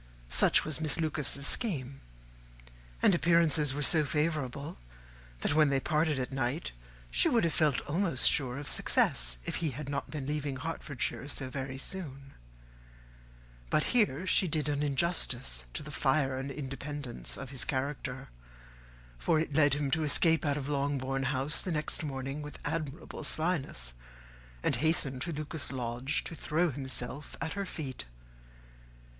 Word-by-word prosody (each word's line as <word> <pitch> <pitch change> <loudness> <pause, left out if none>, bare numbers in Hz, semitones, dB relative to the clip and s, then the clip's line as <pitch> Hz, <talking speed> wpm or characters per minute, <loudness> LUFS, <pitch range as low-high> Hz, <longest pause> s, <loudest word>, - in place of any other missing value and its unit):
Such - - +4
was 155 +1 -2
Miss 155 0 +3
Lucas's 150 -3 0
scheme; 140 - +1 1.0
and - - +6
appearances 165 -4 +4
were 145 - -2
so 155 +1 +5
favourable, 150 - -2 0.6
that - - +1
when 155 -1 +5
they 135 -1 +2
parted 150 +1 +1
at 130 0 -3
night, 135 +4 -2 0.4
she - - +4
would 235 - +3
have 165 -2 +1
felt 150 -5 +2
almost 165 -4 +2
sure 130 -3 +1
of 145 0 -6
success - - +2
if - - -2
he 165 - 0
had 140 +2 -6
not 140 -1 -3
been 150 -4 -4
to 145 - -2
leave 145 -3 -2
Hertfordshire 145 -3 -3
so 130 -3 -4
very 135 0 -4
soon. 140 -4 -6 1.4
But 155 - +3
here 195 - +3
she 185 0 +4
did 155 -2 0
injustice 140 - 0
to - - -3
the 150 - -8
fire 135 -1 +2
and 135 +1 -4
independence 140 -2 -5
of 135 0 -7
his 130 -4 +2
character; 135 -2 -3 0.9
for 155 - +2
it 155 -2 -2
led 145 -2 +5
him 145 -2 -1
to 160 +1 +2
escape 160 +2 +4
out 145 0 +1
of 140 -2 -4
Longbourn 140 -2 -1
House 135 +3 +1
the 185 - -3
next 155 0 -2
morning 135 0 -4
with 150 0 -8
admirable 155 0 -4
slyness, 145 - 0 0.7
and - - +2
hasten 150 -4 +1
to 170 - -3
Lucas 150 -3 -4
Lodge 125 +2 -1
to - - -5
throw 165 +1 0
himself 130 +1 -1
at 160 - -3
her 200 -1 -3
feet. 135 - -5
145 Hz, 155 wpm, -31 LUFS, 135-155 Hz, 1.4 s, and